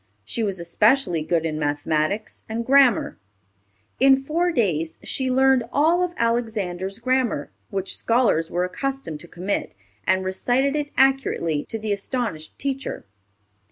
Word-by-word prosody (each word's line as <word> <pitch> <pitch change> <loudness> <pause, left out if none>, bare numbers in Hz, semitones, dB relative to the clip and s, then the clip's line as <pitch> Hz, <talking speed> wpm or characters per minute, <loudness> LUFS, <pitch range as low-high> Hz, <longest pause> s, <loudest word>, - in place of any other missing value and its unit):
She 230 - -2
was 200 -4 -1
especially 180 - +2
good 165 +1 0
in 155 -1 -2
mathematics 155 +7 -1
and 230 +1 -3
grammar. 265 - +4 0.8
In 270 0 +5
four 340 +5 0
days 165 - 0
she 260 -1 -1
learned 265 -1 +4
all 320 +5 +3
of 355 -1 -1
Alexander's 215 -5 -1
Grammar, 240 - 0 0.2
which 195 -1 -1
scholars 225 -9 +2
were 175 +1 0
accustomed 265 - -4
to 170 - -12
commit, 180 - -3 0.3
and 190 0 +2
recited 250 +9 +1
it 295 -1 -2
accurately 265 - +2
to 225 - -3
the 215 -1 -2
astonished 200 - -4
teacher. 270 -1 -4
225 Hz, 135 wpm, -23 LUFS, 175-265 Hz, 0.8 s, In